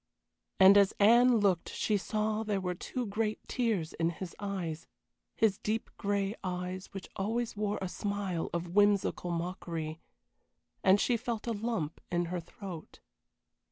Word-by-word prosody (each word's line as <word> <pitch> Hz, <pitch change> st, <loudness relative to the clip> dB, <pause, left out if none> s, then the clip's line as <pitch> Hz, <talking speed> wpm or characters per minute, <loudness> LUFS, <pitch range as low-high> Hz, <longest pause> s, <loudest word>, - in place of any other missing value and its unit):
And 195 Hz, +1 st, +9 dB
as 200 Hz, -1 st, +4 dB
Anne 235 Hz, +4 st, +6 dB
looked 195 Hz, -5 st, +2 dB
she 215 Hz, -, 0 dB
saw 215 Hz, +2 st, 0 dB
there 210 Hz, -3 st, -1 dB
were 180 Hz, -1 st, -2 dB
two 245 Hz, +7 st, -4 dB
great 215 Hz, +1 st, -1 dB
tears 215 Hz, -10 st, 0 dB
in 165 Hz, 0 st, +1 dB
his 170 Hz, +1 st, -7 dB
eyes 185 Hz, -6 st, -4 dB, 0.5 s
his 215 Hz, -4 st, +2 dB
deep 220 Hz, +2 st, -2 dB
gray 200 Hz, 0 st, 0 dB
eyes 180 Hz, 0 st, -4 dB
which 195 Hz, -2 st, -8 dB
always 225 Hz, +4 st, -1 dB
wore 210 Hz, 0 st, -1 dB
a -, -, -1 dB
smile 195 Hz, -1 st, -2 dB
of 170 Hz, +1 st, -3 dB
whimsical 205 Hz, -3 st, +3 dB
mockery 170 Hz, -2 st, -3 dB, 0.8 s
and 190 Hz, +1 st, +6 dB
she 240 Hz, +2 st, +2 dB
felt 230 Hz, -1 st, -4 dB
a 235 Hz, -, -1 dB
lump 210 Hz, -8 st, -2 dB
in 175 Hz, 0 st, +1 dB
her 180 Hz, -, -1 dB
throat. 175 Hz, 0 st, -9 dB
200 Hz, 150 wpm, -31 LUFS, 180-215 Hz, 0.8 s, And